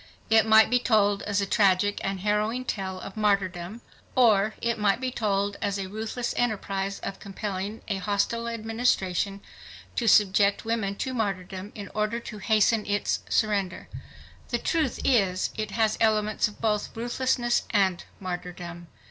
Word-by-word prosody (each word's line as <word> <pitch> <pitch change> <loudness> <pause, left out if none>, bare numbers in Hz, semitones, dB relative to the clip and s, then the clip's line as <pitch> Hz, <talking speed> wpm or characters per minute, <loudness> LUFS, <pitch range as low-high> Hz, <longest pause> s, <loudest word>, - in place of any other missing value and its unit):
It 220 -1 +5
might 220 +1 +6
be 245 - +4
told 205 -4 +2
as 200 0 +1
a - - 0
tragic 200 0 +2
and 195 -1 -2
harrowing 215 +5 0
tale 190 -5 -3
of 195 - -8
martyrdom. 200 -1 0 0.3
Or 215 -4 +4
it 235 -1 -1
might 205 +1 +2
be 260 0 -2
told 200 -3 -1
as 200 -1 -1
a 195 - -3
ruthless 220 +4 -4
enterprise 200 -4 -1
of 195 - -5
compelling 200 +1 -5
a 200 - -1
hostile 205 +4 -1
administration 215 -4 0 0.5
to 235 - 0
subject 200 0 +4
women 220 -3 -1
to 260 +5 -3
martyrdom 195 -3 -3
in 205 -2 -7
order 215 +2 -1
to 215 -2 -9
hasten 215 +1 +3
its 205 0 0
surrender. 200 -4 0 0.6
The - - +1
truth 315 -7 0
is, 195 -8 +2
it 215 -1 -3
has 220 +1 0
elements 215 -1 +2
of 210 - -12
both 215 -1 -1
ruthlessness 240 +1 +1
and 190 -4 +2 0.2
martyrdom. 175 -2 -6
210 Hz, 150 wpm, -26 LUFS, 195-225 Hz, 0.6 s, might